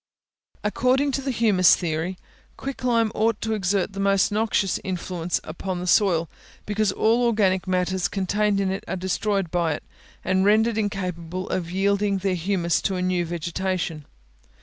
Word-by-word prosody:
According 255 +6 +2
to 275 - -1
the 270 - -3
humus 215 -7 +4
theory, 170 +2 -3 0.4
quick 275 -1 -6
lime 230 -3 +2
ought 225 0 +1
to 220 0 -1
exert 195 -1 0
the 195 - -6
most 195 0 +2
noxious 210 -3 +1
influence 180 -2 -2
upon 180 +3 -5
the 180 - -4
soil, 175 -3 +3 0.4
because 210 -1 +1
all 225 +5 +2
organic 200 -6 +2
matters 185 0 0
contained 200 +2 0
in 195 -1 0
it 190 - -4
are - - -2
destroyed 190 0 -1
by 170 -3 +1
it, - - -6 0.4
and 190 +1 +2
rendered 220 +2 +3
incapable 185 -3 -3
of 175 -3 -2
yielding 200 +2 +1
their 190 0 -1
humus 175 -1 0
to 190 - -1
a 180 - -2
new 180 -1 +1
vegetation. 170 -2 -3
190 Hz, 160 wpm, -24 LUFS, 180-210 Hz, 0.4 s, humus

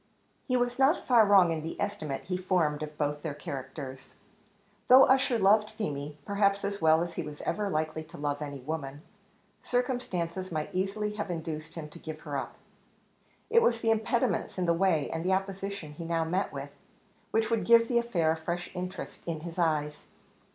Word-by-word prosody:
He 255 -2 +2
was 245 +1 -1
not 275 +6 +3
far 235 -4 +6
wrong 190 -4 +6
in 160 -1 -2
the 165 +2 -6
estimate 180 -9 -3
he 185 - -3
formed 180 -5 +1
of 150 0 -6
both 150 0 -1
their 150 -3 -4
characters. 135 -1 -7 0.7
Though 260 +2 +9
Ussher 260 -2 +4
loved 210 +1 +4
Feemy, 145 -7 -4
perhaps 200 0 +2
as 200 -1 -3
well 160 +1 +5
as 175 - -5
he - - -3
was 150 -2 -8
ever 205 -1 -1
likely 155 -1 -2
to 165 +2 -12
love 145 0 -2
any 140 -2 -5
woman, 145 0 -5 0.6
circumstances 190 -8 -2
might 155 -2 -3
easily 200 +3 -1
have 205 -2 -3
induced 160 -2 -5
him 160 -3 -6
to 170 - -13
give 155 -1 -7
her 145 -3 -5
up. 135 - -4 1.0
It 465 0 +6
was 230 - +2
the 225 - +3
impediments 225 0 0
in 180 - 0
the 170 - +3
way, 165 -4 +2
and 165 0 -3
the 185 +1 +2
opposition 195 -3 -3
he 170 - -7
now 165 0 0
met 180 +5 -1
with, - - -6 0.6
which 225 0 +1
would 230 - +1
give 230 0 +6
the 240 -1 +3
affair 180 -10 +1
a 160 - -1
fresh 170 +2 -4
interest 180 0 -6
in 160 -2 -3
his 170 +1 -7
eyes. 150 -3 +1
175 Hz, 190 wpm, -29 LUFS, 155-205 Hz, 1.0 s, Though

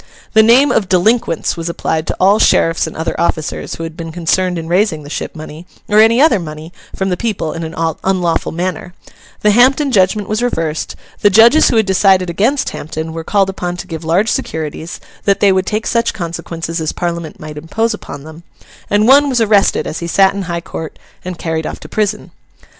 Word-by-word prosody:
The 220 - +7
name 245 +6 +5
of 195 -4 0
Delinquents 185 -2 +1
was 165 0 -4
applied 160 -1 -2
to - - -3
all 200 +3 +4
sheriffs 165 -5 +3
and 160 - -8
other 160 - -2
officers 160 -3 -2
who 165 - -7
had 165 -1 -6
been 165 -1 -7
concerned 180 +2 0
in 165 -1 -5
raising 175 -3 +1
the 145 - -10
ship - - -5
money, 155 +2 -10 0.2
or 210 0 +3
any 225 +2 +5
other 270 -8 +4
money, 155 0 -8 0.2
from 190 0 -1
the 180 - 0
people, 190 -6 -3
in 165 - -5
an 160 0 -6 0.3
unlawful 180 -3 0
manner; 180 +1 -4 0.5
the 210 - +4
Hampden 265 +5 +4
judgment 200 -1 +2
was 215 +2 -1
reversed; 165 -10 -2 0.2
the 205 - +4
judges 230 +9 +6
who - - +1
had 220 -1 +3
decided 190 -2 +3
against 235 +11 0
Hampden 160 +1 -6
were 165 0 -5
called 195 +1 +1
upon 180 -2 -4
to - - -7
give 165 -1 -7
large 175 +7 +1
securities 160 +1 -4 0.3
that 200 -1 +2
they 200 - +4
would 190 0 0
take 215 +2 -2
such 230 -1 0
consequences 170 -2 -5
as 155 - -1
Parliament 170 -2 -4
might 155 -1 -8
impose 225 +9 -1
upon 145 -9 -9
them; 160 +2 -11 0.5
and 205 +2 +2
one 285 +2 +6
was 255 -2 +1
arrested 210 -3 +2
as 155 - -4
he 170 - -5
sat 195 +3 +3
in 200 - -4
High 170 0 -2
Court, 160 -1 -7 0.3
and 180 -1 -6
carried 160 -1 -3
off - - -6
to - - -11
prison. 210 0 -2
180 Hz, 205 wpm, -15 LUFS, 165-215 Hz, 0.5 s, The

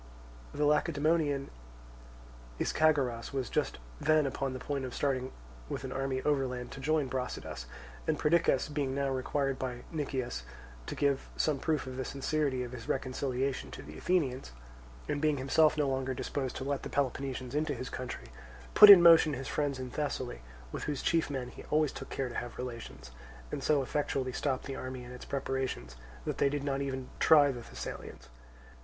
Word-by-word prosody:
The 150 - 0
Lacedaemonian 150 -1 +2 1.1
Ischagoras 140 -7 +2
was 130 -4 -2
just - - 0 0.2
then 155 -1 +4
upon 135 0 -2
the - - -4
point 140 +1 -3
of 130 -1 -5
starting 130 -2 0 0.4
with - - -4
an 130 - -5
army 135 0 -2
overland 130 -4 0
to - - -8
join 150 0 +1
Brasidas; 125 - -4 0.4
and - - +2
Perdiccas, 160 -3 +3
being 140 -3 -1
now 140 0 0
required 135 +1 -1
by 125 -2 -4
Nicias 135 - -2 0.5
to - - -4
give 140 -2 +1
some 150 -3 +1
proof 155 -2 0
of 130 0 -6
the 130 - -1
sincerity 140 -1 -1
of 120 - -6
his 120 -2 -8
reconciliation 130 - -1
to 65 - -8
the 75 +2 -10
Athenians, 135 - 0 0.5
and 145 - -1
being 155 -2 +2
himself 150 +4 +3
no 150 -2 +2
longer 130 -1 -1
disposed 135 +1 -3
to 130 - -4
let 140 0 -1
the - - -6
Peloponnesians 130 -2 -2
into 150 0 0
his 130 - -6
country, 125 - -6 0.4
put 210 - +11
in 190 -4 +12
motion 165 -3 +8
his 135 -1 -4
friends 145 -3 -1
in 130 -1 -6
Thessaly, 130 - -3 0.3
with - - -4
whose 145 -3 -2
chief 165 -3 +2
men 130 -3 -3
he - - -11
always 155 -1 +2
took - - -8
care 135 - -2
to 120 - -7
have 120 0 -5
relations, 115 - -7 0.4
and 140 - -3
so 145 -3 +3
effectually 135 -1 -1
stopped 130 -1 -1
the 135 - -4
army 130 -1 -6
and 125 +1 -9
its 125 - -9
preparation 135 - -2 0.4
that - - -3
they 140 - +4
did 145 0 -2
not 140 -1 -1
even 130 -2 -3
try 145 -3 +7
the 120 -2 -6
Thessalians. 60 - -8
135 Hz, 180 wpm, -31 LUFS, 130-145 Hz, 1.1 s, in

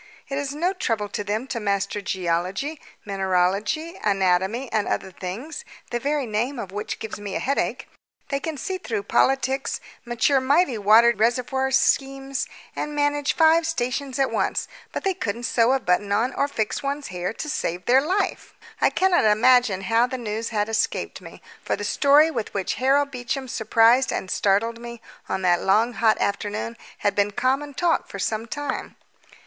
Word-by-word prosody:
It 275 0 -2
is 285 0 -4
no 350 +5 0
trouble 225 - -2
to 205 - -3
them 210 +4 -2
to 235 - -2
master 200 0 -1
geology, 190 - -2 0.2
mineralogy, 195 - 0
anatomy, 195 +4 +1
and 215 -2 0
other 190 - -2
things, 235 - -6 0.3
the 240 - -1
very 285 +1 -1
name 235 +5 -2
of 195 -5 -6
which 205 +2 -4
gives 220 -1 -6
me 205 -2 -5
a - - 0
headache. 275 +1 -1 0.4
They 275 - 0
can 315 +1 -4
see 375 +6 -4
through 410 +1 -3
politics, 270 -3 +1 0.2
mature 240 +3 +2
mighty 275 -2 +2
water 220 +4 +6
reservoir 250 +4 +1
schemes, 270 0 +1 0.3
and 300 0 -4
manage 290 -1 +1
five 325 0 +4
stations 265 -2 -2
at 270 -1 +1
once, - - 0 0.2
but - - -4
they 390 - +1
couldn't 235 - -4
sew 230 0 +2
on 265 - +4
a 265 - -13
button 190 +3 +1
or 250 +6 +1
fix 220 -7 -2
one's 280 +1 -3
hair 180 0 -3
to 305 - -6
save 180 - -3
their 255 +2 +5
life." 370 +8 -2 0.3
I - - +5
cannot 370 -8 +2
imagine 215 -1 +4
how 225 +5 +2
the 260 - -4
news 225 -1 -3
had 210 -2 0
escaped 225 -1 -1
me, - - -12 0.2
for - - 0
the - - -6
story 295 +3 +4
with 220 -9 -4
which 195 -2 -1
Harold 280 +2 +3
Beecham 255 +1 -4
surprised 230 +3 +3
and 185 - -3
startled 225 +4 +1
me 235 0 -8 0.3
on 190 - -2
that 175 -1 +3
long 220 +5 +3
hot 220 -1 +3
afternoon 210 +3 -2 0.3
had 205 - +3
been 205 0 +2
common 265 +6 -1
talk 335 +3 +1
for - - -8
some 220 +3 -2
time. 290 +1 -4
240 Hz, 175 wpm, -24 LUFS, 205-280 Hz, 0.4 s, water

